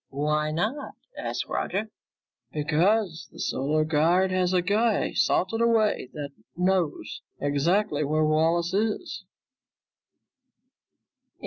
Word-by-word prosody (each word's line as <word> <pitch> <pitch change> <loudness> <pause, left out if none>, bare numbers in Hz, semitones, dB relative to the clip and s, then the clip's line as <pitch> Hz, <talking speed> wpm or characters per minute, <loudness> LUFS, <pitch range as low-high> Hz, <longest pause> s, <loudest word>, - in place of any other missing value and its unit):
"Why 150 +2 0
not?" 215 - -3 0.2
asked - - -3
Roger. 210 +3 -2 0.6
"Because 165 +4 +1
the - - -15
Solar 155 +3 0
Guard 170 +5 +2
has 185 -1 +1
a 180 -1 +2
guy 215 +3 +1
salted 225 +5 +1
away 225 - +2
that 145 -2 -6 0.3
knows 180 - -1 0.2
exactly 150 +4 +1
where 155 +2 +1
Wallace 165 +3 +2
is." 215 - -2
175 Hz, 100 wpm, -26 LUFS, 150-205 Hz, 0.6 s, Guard